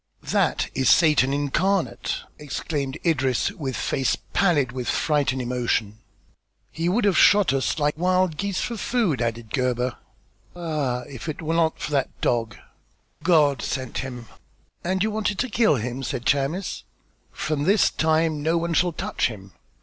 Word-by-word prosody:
"That - - 0
is 130 -1 +2
Satan 150 -5 +5
incarnate," 165 +7 0 0.2
exclaimed 145 -2 -3
Idris, 135 -1 +1
with 140 - -5
face 135 -2 0 0.2
pallid 150 -10 +2
with 125 -1 -5
fright 150 -3 +1
and 130 - -4
emotion. 120 -4 -1 0.7
"He 165 +2 -1
would 210 +5 +1
have 200 -3 +3
shot 205 -7 +5
us 135 +3 0
like 150 -1 +1
wild 185 -1 +2
geese 200 +3 -2
for 235 - -3
food," 205 - 0
added 115 -1 -3
Gebhr. 125 -1 0 0.6
"Ah, 150 -8 -2
if 130 +4 -8
it 155 - -5
was 160 +1 -1
not 165 -1 +2
for - - -4
that 140 -3 -1
dog." 115 -3 0 0.7
"God 150 -7 +3
sent 130 -3 -3
him." 125 -3 -6 0.6
"And 185 +2 0
you 220 - 0
wanted 210 -2 -1
to 255 - -1
kill 215 -7 +3
him?" 125 +2 -4
said 125 -1 -4
Chamis. 145 +8 0 0.5
"From 150 -2 -2
this 200 +3 +4
time 160 -1 +1
no 160 +3 +1
one 170 0 -1
shall 175 +1 +2
touch - - -1
him." 100 -4 -10
150 Hz, 155 wpm, -24 LUFS, 130-175 Hz, 0.7 s, Satan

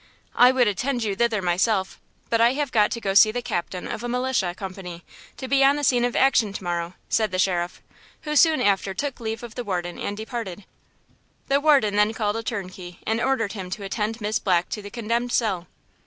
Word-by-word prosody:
I 250 +1 +6
would 255 -3 +3
attend 240 +5 -1
you 205 -3 -1
thither 220 -2 +1
myself, 190 +2 0 0.3
but 230 0 +3
I 235 +2 +5
have 285 -1 -2
got 210 -2 +3
to 235 - -3
go 195 -4 -2
to - - -4
see 215 +1 +7
the 245 +2 -4
captain 180 -1 -3
of 230 - -5
a 240 - -3
militia 250 -8 0
company 185 -3 -8 0.3
to 260 - -6
be 275 +1 +3
on 275 +1 +5
the 295 - -3
scene 245 -3 +3
of 245 - -2
action 240 -6 +3
to 200 - -6
morrow," 175 0 -3
said 220 -1 +1
the 185 - -3
sheriff, 180 -2 -1 0.4
who 300 -1 -3
soon 310 -3 +5
after 195 -2 +1
took 280 -2 -3
leave 225 0 -4
of 235 -2 -8
the 245 - -5
warden 175 -4 -3
and 205 - -4
departed. 220 -4 -6 0.8
The 280 +1 +3
warden 275 -9 +4
then 210 +1 +3
called 210 0 -1
a - - -2
turnkey 185 -5 -6
and 225 +1 0
ordered 250 -6 0
him 190 -4 -6
to 200 +2 -5
attend 215 +3 -3
Miss 215 +1 0
Black 180 -2 +1
to 210 - -4
the 205 - -9
condemned 235 +2 -2
cell. 190 -7 0
215 Hz, 220 wpm, -24 LUFS, 190-245 Hz, 0.8 s, see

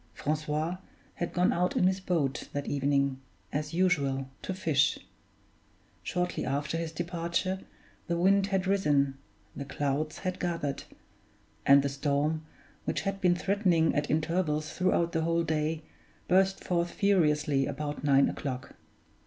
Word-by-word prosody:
Francois 155 +3 -1 0.4
had 175 - -3
gone 180 0 +2
out 180 +1 0
in - - +3
his 190 +1 +2
boat 165 -8 -1
that 145 0 -2
evening, 140 -1 +1 0.3
as 150 +1 -2
usual, 140 -7 +1
to - - -4
fish. 160 -6 +2 1.0
Shortly 180 0 -2
after 140 +4 -1
his 165 -1 -2
departure, 170 +3 -2 0.5
the 170 - 0
wind 195 +3 +4
had 195 -1 0
risen, 145 -8 +2 0.4
the 140 - -4
clouds 145 +2 -2
had 185 -1 -3
gathered; 165 -6 -2 0.8
and 140 0 +7
the - - +1
storm, 145 +3 0 0.4
which - - -1
had 195 0 -3
been 180 -1 +4
threatening 185 -4 +2
at 145 0 -1
intervals 155 -1 0
throughout 175 -2 +1
the 160 - 0
whole 165 +1 +1
day, 155 0 -1 0.4
burst 190 +1 +3
forth 175 -1 0
furiously 150 -9 +2
about 145 +1 -4
nine 140 -1 +5
o'clock. 130 -3 -5
160 Hz, 135 wpm, -29 LUFS, 145-180 Hz, 1.0 s, and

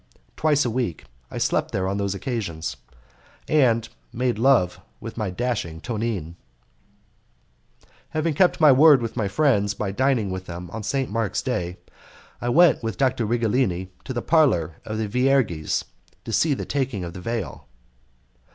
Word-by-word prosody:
twice 150 -3 +2
a - - +1
week 115 -8 -2 0.2
I - - -7
slept - - 0
there 95 0 -1
on 100 +1 -1
those 100 -1 -1
occasions, 95 - -4 0.7
and 120 -7 +3 0.2
made 125 -2 -1
love 90 -9 +3 0.2
with 115 - -8
my 110 -4 -2
dashing 90 -6 -3
Tonine. 105 -6 -3 1.8
Having 155 +1 -1
kept 180 +4 +3
my 155 -3 +7
word 145 +1 +7
with 115 -2 -4
my 110 -4 0
friends 105 -4 +2
by 105 -2 -3
dining 120 -3 +1
with 95 0 -5
them 85 0 -7
on 110 - -5
St. 130 +3 -2
Mark's 110 -3 -1
Day, 90 +1 -2 0.6
I 120 - -1
went 165 +2 +5
with 115 -5 -4
Dr. 125 -3 +1
Righelini 110 -5 0
to - - -6
the 120 -2 -3
parlour 90 - +2
of 110 0 -4
the 110 -1 -1
Vierges 125 - +1 0.4
to 115 - -5
see 145 +6 +3
the - - -5
taking 130 -9 -2
of 85 -1 -6
the 90 - -8
veil. 115 -1 -4
115 Hz, 160 wpm, -24 LUFS, 95-130 Hz, 1.8 s, my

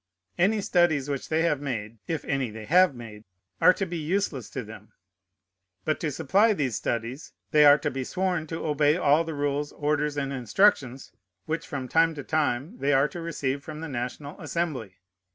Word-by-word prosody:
Any 205 +4 +2
studies 160 -7 +2
which 140 - -4
they 160 +1 +2
have 150 -4 +1
made 115 -5 -4
(if 165 -3 -3
any 135 -3 -1
they 110 0 -9
have 180 -1 +4
made) 110 -3 -10 0.4
are - - +8
to 195 - -2
be 175 -2 -4
useless 155 - -2
to 130 - -5
them. 110 -1 -12 0.9
But 155 - 0
to 160 - -1
supply 200 - +3
these 135 - -1
studies, 120 +7 -4 0.2
they 150 -1 +6
are 145 0 +8
to 150 -1 -2
be 130 0 -3
sworn 180 +1 -1
to 160 +1 -5
obey 150 +1 +2
all 150 -1 +3
the 160 -2 -5
rules, 145 0 -1
orders, 150 0 -1
and 140 -1 -2
instructions 130 - +1 0.3
which 160 +1 -3
from 135 -3 -4
time 165 +4 +3
to 145 - -6
time 155 - -1
they 145 +1 +2
are 135 +1 +4
to 175 - -7
receive 140 -4 -3
from 155 +1 -8
the 165 - -5
National 135 +2 -5
Assembly. 140 - -3
145 Hz, 190 wpm, -26 LUFS, 130-165 Hz, 0.9 s, are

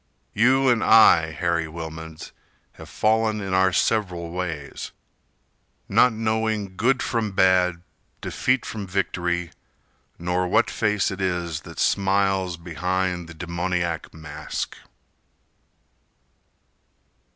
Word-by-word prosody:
You 130 +5 +4
and 120 -3 +3
I, 85 -7 +6
Harry 85 0 -1
Wilmans, 80 0 -8 0.4
have - - -13
fallen 110 0 +1
In 95 -2 -4
our 95 0 +4
several 90 -3 0
ways, 85 -5 -5 0.9
not 125 - +5
knowing 110 -3 -1
Good 125 +6 +2
from 110 -4 -1
bad, 90 -2 +3 0.4
defeat 125 0 0
from 105 -3 -5
victory, 90 -2 -1 0.7
Nor 90 +1 -1
what - - +2
face 105 -2 +1
it 95 0 -5
is 85 -4 -2
that - - -12
smiles 95 -2 +1
Behind 90 +1 -2
the 85 - -10
demoniac 85 0 -2
mask. 80 -2 -6
90 Hz, 105 wpm, -24 LUFS, 85-105 Hz, 0.9 s, I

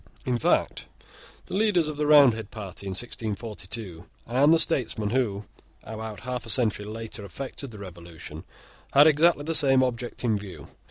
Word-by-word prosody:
In 125 -2 0
fact, - - 0 0.6
the - - -10
leaders 195 -5 +2
of 155 - -4
the 150 0 -1
Roundhead 125 -8 +5
party 100 -3 -8
in 95 - -3
1642, 105 -4 -5 0.2
and 135 +6 +3
the 165 - +6
statesmen 120 -10 +1
who, 110 -6 -1 0.4
about 110 -2 -7
half 125 0 -5
a - - -5
century 110 -2 +2
later, 110 0 -7
effected 135 +7 -7
the 110 - -11
Revolution, 85 -4 -10 0.5
had 145 +2 +7
exactly 155 0 +4
the 165 +2 -2
same 135 -4 +5
object 120 -1 -4
in 110 -4 +1
view. 90 -8 -10
115 Hz, 160 wpm, -26 LUFS, 105-140 Hz, 0.6 s, had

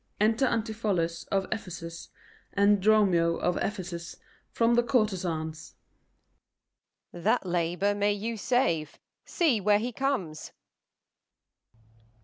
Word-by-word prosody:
Enter 225 +5 +3
ANTIPHOLUS 210 -8 -1
of 195 -1 0
Ephesus 170 -5 -6 0.4
and 200 0 +4
DROMIO 185 -5 +4
of 180 0 0
Ephesus 175 -4 -4 0.3
from 230 0 +2
the 240 - +5
courtezan's. 180 - -1 1.4
Off. 175 - -9
That 170 - +2
labour 175 +3 0
may 205 0 +1
you 220 +3 -3
save: 200 - 0 0.3
see 285 - +1
where 205 +1 +4
he 235 +4 -3
comes. 220 - -3
200 Hz, 105 wpm, -28 LUFS, 170-220 Hz, 1.4 s, the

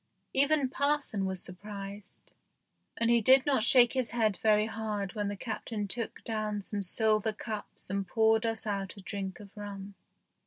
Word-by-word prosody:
Even 280 +1 +4
parson 280 -7 0
was 190 -1 -1
surprised, 200 +2 -8 0.6
and 230 0 +2
he 235 -1 +5
did 260 +4 +6
not 275 -5 +2
shake 240 +1 +6
his 255 -3 0
head 220 -4 +1
very 215 +1 +3
hard 210 -3 -3
when 205 -1 -2
the 205 0 -4
Captain 220 -1 -4
took 230 +3 -5
down 215 -2 -2
some 205 +1 -3
silver 215 +2 +1
cups 215 0 -7
and 195 0 -2
poured 220 +2 +3
us 225 -2 -1
out 200 -2 -3
a - - -9
drink 195 -1 -5
of 200 -2 -12
rum. 200 -1 -7
215 Hz, 165 wpm, -30 LUFS, 200-230 Hz, 0.6 s, did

